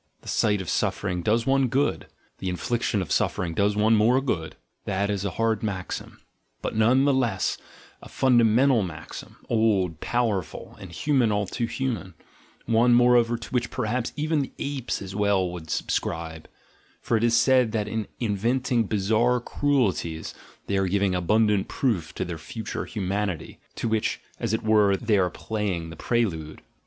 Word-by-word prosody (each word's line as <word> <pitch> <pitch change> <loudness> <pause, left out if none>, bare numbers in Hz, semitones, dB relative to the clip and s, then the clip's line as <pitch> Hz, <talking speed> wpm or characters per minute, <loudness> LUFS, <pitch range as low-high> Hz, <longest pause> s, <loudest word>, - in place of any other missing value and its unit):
The - - -17
sight 105 -3 +1
of 90 - -6
suffering 90 -4 -1
does 115 +5 +1
one 135 -1 +3
good, 135 +4 0 0.3
the 95 - -3
infliction 105 +2 -1
of 85 - -9
suffering 85 -2 0
does 100 +4 +1
one 110 +2 +4
more 115 +5 +4
good 90 -12 -2
— - - -48
this 100 +1 0
is 100 -1 -2
a - - 0
hard 115 -1 +1
maxim, 100 -4 -5 0.4
but - - -3
none 120 +5 +4
the 140 - +4
less 120 -8 0 0.4
a - - -12
fundamental 125 0 +4
maxim, 85 -5 -7
old, 100 -8 +1
powerful, 105 -9 -2
and 95 -3 -10
"human, 125 - +1
all 105 0 +1
too 115 +5 -3
human"; 115 -9 -3 0.5
one, 120 +1 +4
moreover, 120 -1 +4
to 115 - -9
which 125 -2 0
perhaps 120 +2 -2
even 155 0 0
the 135 - -5
apes 135 -7 -3
as 95 0 -7
well 100 -2 +2
would 85 -2 -8
subscribe: 80 +1 -3 0.5
for - - -1
it 110 - +1
is 120 0 +4
said 130 -4 +4
that 105 -2 -1
in 110 -1 -3
inventing 120 +3 0
bizarre 110 +5 +2
cruelties 115 - -1 0.3
they 100 - -1
are 95 -1 +1
giving 100 0 +1
abundant 105 +3 +2
proof 100 - -2
of - - -1
their 85 -2 -5
future 110 +8 -5
humanity, 100 -3 -3 0.2
to - - -2
which, 110 -1 0 0.2
as 115 - -1
it 110 - -1
were, 105 -3 +4
they 110 -2 +1
are 90 -1 +2
playing 95 -4 -3
the - - -8
prelude. 80 -9 -2
110 Hz, 170 wpm, -25 LUFS, 95-120 Hz, 0.5 s, one